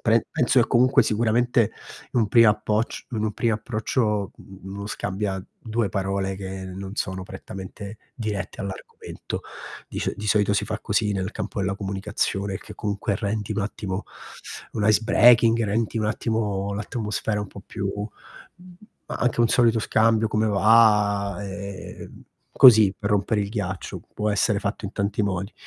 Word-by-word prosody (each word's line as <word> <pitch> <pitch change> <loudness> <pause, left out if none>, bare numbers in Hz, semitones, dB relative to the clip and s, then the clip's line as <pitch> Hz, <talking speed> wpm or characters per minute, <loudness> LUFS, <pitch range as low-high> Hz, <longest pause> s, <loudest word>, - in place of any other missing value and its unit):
pre 115 -1 +3
penso 125 +1 +3
che 115 - +3
comunque, 130 +2 +5
sicuramente 115 +1 +2 0.4
in 120 - +2
un 105 - +1
primo 115 -1 +6
appoc 105 +2 -1
in 110 -1 -1
un 105 - -1
primo 115 0 +1
approccio 110 -2 -1
u - - -15
u 95 0 -14
uno 100 +1 -6
scambia 95 -2 -3 0.2
2 115 -1 -1
parole 95 0 -2
che 95 0 -6
non 95 +1 -7
sono 95 0 -2
prettamente 95 +2 -9 0.2
dirette 105 -3 -4
all'argomento. 100 -2 -7 0.5
Di - - -6
scio - - -1
di 105 - -5
solito 105 -1 +3
si 100 - +1
fa 110 0 -4
così 105 +1 0
nel 95 0 -2
campo - - -5
della 95 0 0
comunicazione 100 0 -2
che - - -11
comunque 100 0 -2
rendi 105 -1 -3
un - - -1
attimo 100 -1 -4 0.7
un 105 -2 0
icebreaking, 115 +1 +5
rendi 110 +2 -1
un 110 - 0
attimo 105 -3 -1
l'atmosfera 105 0 -2
un 105 - -4
po' 100 - -11
più 100 -3 -4
mhmm, 175 - -11 0.3
a - - -6
anche 120 -1 0
un 115 - +4
solito 115 -2 +4
scambio: 110 0 +2
"Come 110 0 +1
va", 105 -1 +4
ehm, 100 -1 -8 0.3
così 110 -6 +8
per 100 - -2
rompere 105 +1 +1
il 100 - -4
ghiaccio, 95 -4 -4
può 105 0 0
essere 105 +1 +2
fatto 105 +1 -3
in 100 - -8
tanti 100 +1 -1
modi. 95 0 -2
105 Hz, 165 wpm, -24 LUFS, 100-110 Hz, 0.7 s, così